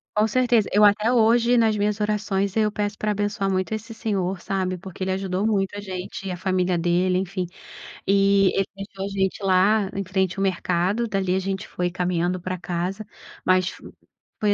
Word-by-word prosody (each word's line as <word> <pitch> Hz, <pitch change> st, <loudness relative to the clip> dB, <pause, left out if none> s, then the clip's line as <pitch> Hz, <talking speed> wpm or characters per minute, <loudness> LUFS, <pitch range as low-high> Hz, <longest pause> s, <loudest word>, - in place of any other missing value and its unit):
Com 215 Hz, +1 st, +3 dB
certeza, 240 Hz, -2 st, +2 dB
eu, 210 Hz, -, +5 dB
até 210 Hz, +3 st, +4 dB
hoje 235 Hz, +1 st, +4 dB
nas 220 Hz, -2 st, +3 dB
minhas 210 Hz, +1 st, 0 dB
orações, 205 Hz, -2 st, 0 dB
eu 215 Hz, -1 st, +2 dB
peço 205 Hz, 0 st, -2 dB
para 210 Hz, 0 st, -1 dB
abençoar 205 Hz, -1 st, -1 dB
muito 185 Hz, +1 st, -1 dB
esse 220 Hz, +1 st, -5 dB
senhor, 195 Hz, -5 st, -2 dB
sabe, 185 Hz, -2 st, -2 dB
porque 190 Hz, +1 st, -7 dB
ele 190 Hz, -, -1 dB
ajudou 190 Hz, +1 st, -1 dB
muito 200 Hz, -3 st, +1 dB
a -, -, -4 dB
gente, 190 Hz, 0 st, -6 dB
e -, -, -2 dB
a -, -, -3 dB
família 185 Hz, -1 st, 0 dB
dele, 180 Hz, +2 st, +2 dB
enfim. 185 Hz, 0 st, -2 dB, 0.6 s
E 195 Hz, 0 st, +4 dB
ele 195 Hz, -, +2 dB
deixou 195 Hz, 0 st, -6 dB
a -, -, -3 dB
gente 195 Hz, 0 st, -1 dB
lá 195 Hz, +2 st, +3 dB
em 195 Hz, -, -2 dB
frente 190 Hz, 0 st, -1 dB
o -, -, 0 dB
mercado. 190 Hz, +3 st, 0 dB
Dali, 195 Hz, -3 st, 0 dB
a -, -, +2 dB
gente 190 Hz, +1 st, -3 dB
foi 180 Hz, 0 st, -2 dB
caminhando 180 Hz, 0 st, -1 dB
para 185 Hz, +1 st, -3 dB
casa. 180 Hz, +4 st, -3 dB, 0.4 s
Mas 185 Hz, 0 st, +2 dB, 0.6 s
foi, 210 Hz, -2 st, +3 dB
195 Hz, 190 wpm, -24 LUFS, 185-210 Hz, 0.6 s, eu